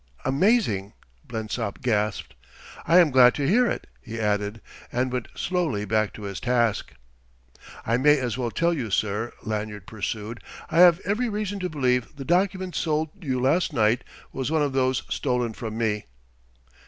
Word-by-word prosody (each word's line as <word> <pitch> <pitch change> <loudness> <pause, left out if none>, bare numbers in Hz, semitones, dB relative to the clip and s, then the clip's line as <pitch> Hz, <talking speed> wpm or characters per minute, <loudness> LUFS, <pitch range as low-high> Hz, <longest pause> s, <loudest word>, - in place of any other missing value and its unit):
"Amazing!" 135 - +2 0.3
Blensop 110 0 -4
gasped. 105 -4 0 0.5
"I 170 - +6
am 170 -5 +6
glad 125 -1 +6
to 140 -2 -1
hear 240 +8 +4
it," - - -3 0.2
he 115 -1 -7
added, 105 0 -1 0.3
and 125 +1 0
went 125 -2 -2
slowly 160 - -1
back 110 0 +1
to 105 - -10
his 100 -2 -5
task. 120 -3 0 0.9
"I 115 +1 +2
may 150 +3 +5
as 125 -4 -2
well 125 -2 -2
tell 170 +8 +1
you, 130 -9 -3
sir," 105 +4 -1
Lanyard 105 -2 -4
pursued, 110 +2 -5 0.3
"I 165 - +2
have 175 0 +7
every 220 +5 0
reason 205 -1 -3
to 180 -1 -2
believe 125 -4 0
the 135 -1 -7
document 185 +2 +1
sold 155 -1 0
you 130 -4 -1
last 155 +6 +2
night 110 -1 +2 0.3
was 130 0 -2
one 160 -1 +2
of 140 -2 -1
those 130 -1 +1
stolen 125 -4 -1
from 110 0 -6
me." 105 - -1
125 Hz, 165 wpm, -25 LUFS, 110-160 Hz, 0.9 s, have